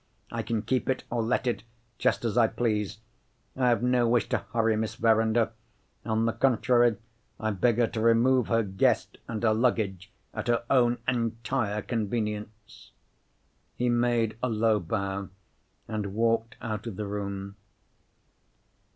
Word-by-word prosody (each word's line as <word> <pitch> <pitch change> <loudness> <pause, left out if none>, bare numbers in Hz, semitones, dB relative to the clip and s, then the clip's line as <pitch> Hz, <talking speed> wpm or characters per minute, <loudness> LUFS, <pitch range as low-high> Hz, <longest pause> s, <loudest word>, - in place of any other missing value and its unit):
I - - -2
can 110 -2 -2
keep 130 +4 -1
it, 130 - 0
or 120 -1 0
let 115 +3 0
it, 120 -4 0 0.4
just - - +1
as 115 - -1
I 120 -2 +5
please. 105 -4 -1 0.6
I 125 -1 +2
have 120 0 +2
no 125 -1 +3
wish 120 0 +2
to - - +1
hurry 115 -1 +2
Miss 110 0 -2
Verinder. 115 0 +3 0.5
On 110 0 0
the 115 - +1
contrary, 120 -2 +3 0.4
I 110 0 -1
beg 110 +3 +2
her 120 - +4
to 110 -1 -4
remove 115 +2 +4
her 115 -1 +2
guest 95 -2 0
and 115 -1 -4
her 110 -1 +4
luggage, 110 -5 0 0.2
at - - -4
her 120 0 +2
own 120 -2 +4
entire 115 -3 -1
convenience." 105 -2 -4 0.8
He 125 0 0
made 120 -2 +1
a 125 - 0
low 110 -1 +2
bow, 100 +1 -3 0.6
and 105 -2 -4
walked 115 0 +1
out 110 -1 -4
of 110 - -5
the 105 - -4
room. 100 -1 -5
115 Hz, 150 wpm, -28 LUFS, 105-120 Hz, 0.8 s, I